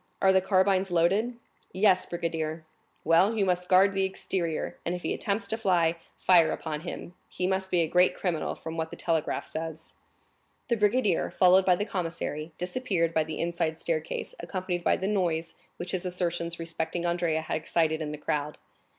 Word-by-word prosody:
Are 190 0 +4
the 190 - +4
carbines 190 0 +2
loaded?" 195 +8 +2 0.4
"Yes, 190 -1 +3
brigadier." 165 -2 -3 0.4
"Well, 180 +8 +4
you 200 - +2 0.2
guard 190 +2 +5
the 195 0 +1
exterior, 185 -3 -2
and 175 - -1
if 180 - -7
he - - 0
attempts 200 0 -2
to 220 - 0
fly, 175 -6 +2 0.2
fire 175 -3 +5
upon 155 -2 -4
him; 175 0 -7 0.2
he 180 - -3
must 190 0 0
be 175 -2 +2
a - - -1
great 180 +3 +3
criminal, 175 -4 -2
from 160 0 -7
what 160 0 -2
the - - -8
telegraph 160 -2 -1
says." 160 0 -6 0.8
The 235 - +3
brigadier, 210 -3 +2
followed 185 0 +5
by 180 - +5
the 205 - -2
commissary, 165 -4 -4
disappeared 180 -4 -1
by 160 - +3
the 155 0 -6
inside 165 -2 -1
staircase, - - -3
accompanied 180 -2 -3
by - - +3
the 190 - -3
noise 170 -5 0 0.2
which 175 +1 -4
his 185 -2 -1
assertions 175 -2 -2
respecting 165 +1 -3
Andrea 170 -2 0
had 160 - -2
excited 160 0 0
in 150 -1 -3
the 150 - -5
crowd. 150 0 -2
175 Hz, 175 wpm, -28 LUFS, 165-190 Hz, 0.8 s, guard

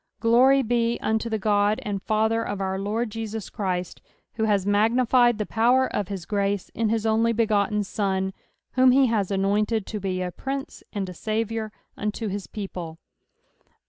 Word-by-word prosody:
Glory 255 +5 +5
be 235 0 +1
unto 220 +1 -1
the 220 - 0
God 205 0 +2
and 200 -2 -3
Father 220 +2 +1
of 205 -3 -4
our 190 0 -2
Lord 215 +3 -2
Jesus 220 -1 -5
Christ, 185 -3 -3 0.3
who 220 -1 -1
has 200 -3 +1
magnified 235 +3 +3
the 210 - -2
power 245 +5 +3
of 205 - -1
bis 190 -3 -6
grace 200 -1 -1
in 225 -2 -1
his 225 0 0
only 225 +1 +3
begotten 210 -2 +1
Sou, 190 -1 -1 0.4
whom 260 0 +5
he 265 +2 +5
has 215 -6 0
anointed 205 +2 +1
to 215 - -5
be 185 -2 -2
a 180 - -3
Prince 270 - -5
and 200 -3 -3
a 180 - -7
Saviour 220 +2 -2 0.2
unto 210 +1 -3
his 200 0 -5
people. 180 -6 -6
215 Hz, 170 wpm, -25 LUFS, 200-230 Hz, 0.4 s, Glory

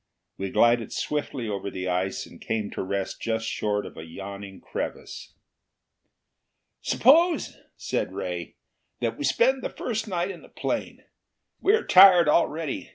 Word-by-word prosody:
We 95 0 -4
glided 120 +2 +3
swiftly 145 -5 -3
over 100 -1 -3
the 95 -1 -5
ice 90 +1 -1
and - - -15
came 110 -2 -2
to - - -4
rest 95 0 -3
just 115 0 -1
short 105 -2 -1
of - - -11
a 80 - -7
yawning 100 +3 -9
crevasse. - - -6 1.5
"Suppose," 325 +5 +3 0.2
said - - -2
Ray, 90 -2 -5 0.4
"that 115 -2 -1
we 145 - -6
spend 250 - +2
the - - -3
first 220 -2 -4
night 180 -1 -1
in 175 - -10
the - - -16
plane. - - -4 0.6
We 400 - +3
are 450 - -2
tired 185 -3 +8
already. 155 -1 0
115 Hz, 150 wpm, -26 LUFS, -, 1.5 s, tired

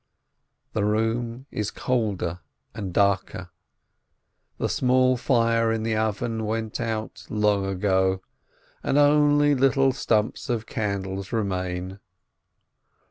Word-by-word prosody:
The 105 - 0
room 115 +4 -1
is 105 -1 -2
colder 100 -9 -1 0.3
and 100 -5 -5
darker, 100 +1 0 1.1
the - - -1
small 130 0 +3
fire 115 -2 +2
in 110 -1 -1
the 110 0 0
oven 110 +1 -1
went 110 0 -3
out 110 -2 -4
long 105 -2 +1
ago, 95 -1 +1 0.6
and 140 - 0
only 145 0 +5
little 135 0 +3
stumps 110 -4 0
of 115 -2 -1
candles 100 -3 -3
remain. 95 -3 -2
110 Hz, 105 wpm, -25 LUFS, 100-120 Hz, 1.1 s, only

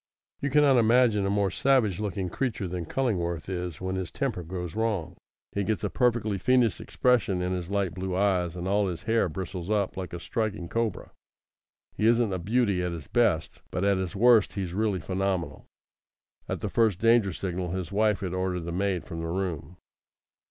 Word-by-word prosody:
You 140 - -1
cannot 145 -2 +5
imagine 115 -3 +4
a - - 0
more 100 -1 +1
savage 120 -6 +2
looking 100 -3 -2
creature 115 -2 -2
than 85 -2 -4
Cullingworth 85 -11 -1
is 90 -3 -4
when 95 0 -3
his 95 -3 -3
temper 130 -10 -2
goes 90 0 -6
wrong. 110 -7 -1 0.4
He 100 - -1
gets 110 +1 -1
a - - -1
perfectly 115 -5 +1
fiendish 125 - +2
expression 120 -7 +1
in 90 0 -1
his 90 -1 -4
light 100 -4 0
blue 95 0 -3
eyes, 90 -3 +1
and 90 0 -4
all 100 +1 +2
his 85 -3 -5
hair 115 -4 +2
bristles 90 +2 -5
up 105 -3 0
like 95 -1 -5
a 85 - -5
striking 105 -2 -2
cobra. 115 -1 -2 0.8
He 110 - +2
isn't 115 -3 +3
a 95 - -2
beauty 100 0 +1
at 90 -1 -2
his 80 -4 -7
best, 85 -10 +1
but 90 - -2
at 100 -1 +3
his 95 +1 -4
worst 115 0 +5
he's 95 -4 -4
really 105 -1 0
phenomenal. 95 0 -2 0.8
At - - -3
the - - -2
first 110 -6 +2
danger 115 -1 +4
signal 90 0 -3
his 95 +1 -4
wife 105 -1 +2
had 90 -2 -3
ordered 95 -1 -1
the 85 +1 -5
maid 95 0 -1
from 85 - -6
the 80 - -3
room. 90 -1 -3
95 Hz, 190 wpm, -27 LUFS, 90-110 Hz, 0.8 s, cannot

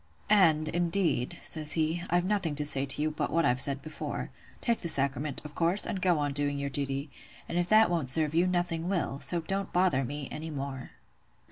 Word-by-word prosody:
"'And, 160 -7 +4
indeed,' 170 -6 0
says 155 -2 +2
he, 160 +1 -1
'I've 175 +1 +1
nothing 190 -6 -1
to 150 0 -2
say 140 -1 +3
to 135 - -1
you 155 - -1
but 155 - -3
what 165 +1 +1
I've 125 +1 +2
said 140 0 +5
before. 155 0 -6 0.3
Take 235 -1 0
the 170 - -1
sacrament, 140 0 +1
of 150 - -9
course, 175 +4 +4
and 200 -5 -4
go 180 -3 +2
on 145 -1 -2
doing 145 0 0
your 140 0 -4
duty; 140 +1 -3 0.4
and - - -6
if 175 0 -1
that 220 +1 +6
won't 160 -7 -1
serve 155 +2 0
you, 170 +3 +2
nothing 175 -1 -2
will. 170 -7 -2
So 170 +2 0
don't 195 +3 -4
bother 180 -7 +1
me 145 +3 -5
any 155 +2 -6
more. 140 -3 -6
155 Hz, 210 wpm, -28 LUFS, 140-175 Hz, 0.4 s, that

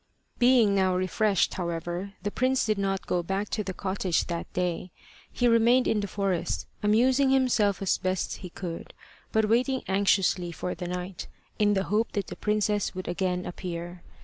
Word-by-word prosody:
Being 240 -4 +5
now 190 -2 +2
refreshed, 185 +2 +1
however, 175 +2 -4
the 205 - -1
prince 260 +2 +1
did 215 -2 0
not 195 -1 -1
go 180 - 0
back 195 +4 -2
to 210 - -2
the 190 - -4
cottage 190 -2 -1
that 170 -1 -5
day: 180 0 -2 0.4
he 245 - +1
remained 235 +2 +4
in 215 - +2
the 205 - -2
forest, 190 -3 -1 0.2
amusing 255 +6 +3
himself 235 -7 +2
as 190 - +1
best 185 0 -2
he 180 - -8
could, 170 -1 -7 0.4
but 220 -1 +2
waiting 255 +4 +1
anxiously 190 -2 +2
for 180 +2 -4
the 180 - -6
night, 180 0 -5 0.3
in 205 -1 +3
the 190 - +1
hope 215 +4 0
that 200 - -1
the - - -8
princess 210 -2 0
would 185 - -5
again 180 0 -1
appear. 175 0 -6
195 Hz, 175 wpm, -27 LUFS, 180-215 Hz, 0.4 s, Being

